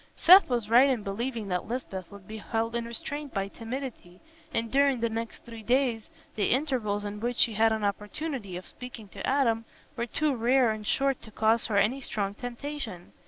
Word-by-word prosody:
Seth 370 0 +8
was 240 -4 0
right 245 +5 +6
in 245 -6 0
believing 225 +2 -3
that 180 -1 -1
Lisbeth 200 -7 -5
would 200 -2 -12
be 220 0 -7
held 225 +2 -2
in 235 0 -1
restraint 280 +4 -5
by 195 0 0
timidity, 225 -5 -7 0.3
and 230 0 -1
during 275 -2 +3
the 230 0 +1
next 225 0 -5
three 230 -1 -9
days, 240 -1 +1 0.2
the 205 - 0
intervals 235 -7 0
in 205 0 -5
which 240 +2 -2
she 230 - +4
had 220 +2 +4
an 220 -1 -1
opportunity 210 - -3
of 185 - -9
speaking 245 -4 -10
to - - -8
Adam 240 -5 +2 0.3
were 235 +1 -2
too 290 +4 0
rare 245 +1 +3
and 215 -1 -5
short 275 -1 +1
to 220 - -10
cause 220 +1 +2
her 210 -3 0
any 230 +7 +2
strong 200 -5 -2
temptation. 245 -5 -6
230 Hz, 195 wpm, -28 LUFS, 210-260 Hz, 0.3 s, Seth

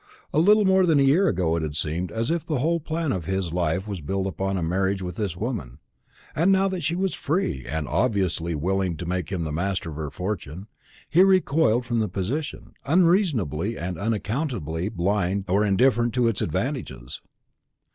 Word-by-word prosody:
A 150 - +3
little 210 +5 +5
more 190 -1 +4
than 155 -4 +4
a - - +5
year 160 +9 +4
ago 85 - +1
it 85 - -1
had 75 -2 -4
seemed 80 +3 -2
as 115 - -1
if 170 -2 0
the 155 - -2
whole 165 +6 +1
plan 160 -1 -2
of 90 -4 -3
his 95 -2 -2
life 90 +2 0
was 100 -5 -5
built 95 +6 -2
upon 95 +1 -2
a 90 - -2
marriage 95 +3 0
with 90 -1 -5
this 95 -5 -3
woman; 100 - -4 0.6
and 170 +5 +3
now 195 0 +4
that 185 -2 -3
she 165 +3 0
was 190 +1 0
free, 150 - -2
and 80 -1 -3
obviously 90 - 0
willing 90 +2 -1
to 90 - -6
make 90 0 -3
him 90 -4 -1
the 80 - -3
master 90 +1 -2
of 75 - -8
her 75 -2 -3
fortune, 90 +1 -5 0.4
he 170 - +4
recoiled 160 - +3
from 120 -1 0
the 110 - +1
position, 130 +11 -4
unreasonably 140 - +2
and 90 -1 -4
unaccountably 105 - -2
blind 95 +1 0
or 100 +3 +2
indifferent 120 +3 +2
to 125 -2 +3
its 115 -4 0
advantages. 75 - -3
100 Hz, 190 wpm, -25 LUFS, 85-140 Hz, 0.6 s, little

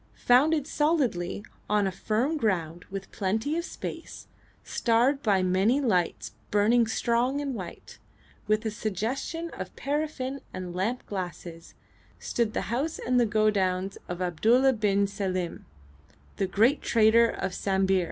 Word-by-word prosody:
Founded 285 +4 +4
solidly 265 - 0 0.2
on 210 -1 +3
a 190 - 0
firm 225 - -1
ground 175 - -1
with 195 0 -7
plenty 220 +9 -1
of 340 - -1
space, - - -7 0.4
starred 245 +5 +2
by 200 -6 +2
many 190 +8 +2
lights 185 -11 0 0.2
burning 225 +3 +3
strong 240 +4 +1
and 280 -2 -3
white, 190 -7 -8 0.5
with 215 +1 +1
a 220 - 0
suggestion 230 - -3
of - - -7
paraffin 280 -2 -3
and 180 -1 -5
lamp 210 +8 -2
glasses, 175 -3 -7 0.4
stood 230 -2 -1
the - - 0
house 295 +7 -1
and 250 0 +1
the 240 - +3
godowns 195 -3 +1
of 180 +1 -3
Abdulla 230 +10 +3
bin 200 -3 +2
Selim, 185 -3 -3 0.7
the 195 - 0
great 225 +10 +3
trader 230 +1 +4
of 190 - -3
Sambir. 190 0 +1
215 Hz, 135 wpm, -27 LUFS, 190-255 Hz, 0.7 s, Founded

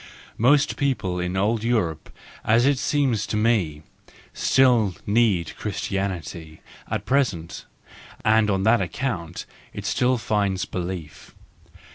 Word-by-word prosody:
Most 135 +5 +3
people 110 -11 -1
in 90 +1 -2
old 105 +3 +1
Europe, 100 -10 -1 0.3
as 115 +3 +3
it 140 -2 +3
seems 140 -7 0
to 105 - -2
me, 100 -10 +1 0.5
still 120 -8 +3
need 105 -6 +1
Christianity 90 -6 -4 0.3
at - - -3
present, 110 -12 -1 0.6
and 110 0 +4
on 95 -1 +1
that 115 +3 +4
account 85 -11 -4 0.3
it - - -7
still 125 +1 +2
finds 100 -4 0
belief. 90 -4 -6
105 Hz, 115 wpm, -24 LUFS, 90-120 Hz, 0.6 s, and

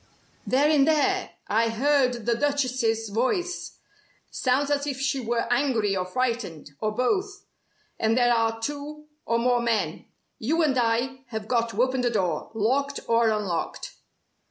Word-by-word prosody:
"They're 275 +7 +3
in 285 -3 +5
there! 365 +5 +2 0.2
I 225 +2 +2
heard 250 -1 +1
the 235 - +2
Duchess's 250 -5 0
voice. 350 - -1 0.5
Sounds 275 +3 +1
as 285 0 0
if 270 -2 -3
she 275 0 0
were 235 -1 -1
angry 235 -7 +1
or 180 -1 -2
frightened, 230 - -2
or 215 - -1
both. 390 - -1 0.5
And 225 +2 +2
there 240 -1 +4
are 225 -1 +1
two 295 +4 -5 0.2
or 230 - +2
more 245 +1 +2
men. 215 -9 -1 0.3
You 320 +9 +1
and 285 -4 +2
I 250 +2 0
have 220 -3 -5
got 235 -1 +1
to 230 +2 +1
open 260 0 0
the 245 - +2
door, 190 -7 -1
locked 275 +6 0
or 230 0 +3
unlocked." 205 -6 -2
245 Hz, 155 wpm, -25 LUFS, 225-280 Hz, 0.5 s, in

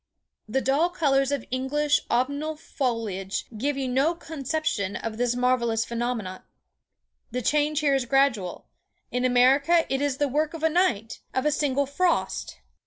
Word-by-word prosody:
"The 265 +5 +1
dull 285 +7 +2
colours 275 -6 +1
of 280 -5 -2
English 285 +3 +1
autumnal 285 +6 0
foliage 225 -10 -3
give 275 +6 -1
you 270 -1 -2
no 270 +7 +2
conception 285 - -3
of 220 +2 -4
this 245 0 +1
marvellous 240 -3 +1
phenomenon. 235 -5 -3 0.9
The 250 0 -3
change 300 +3 +1
here 285 -2 +3
is 270 -2 +1
gradual; 245 -8 +1 0.5
in 250 +1 0
America 275 +7 +4
it 270 - 0
is 285 -2 0
the 290 - +1
work 300 +4 -1
of 320 - -8
a 320 - +4
night—of 260 - -1
a 300 - +3
single 280 -1 +1
frost! 335 +5 -1
270 Hz, 150 wpm, -26 LUFS, 245-295 Hz, 0.9 s, America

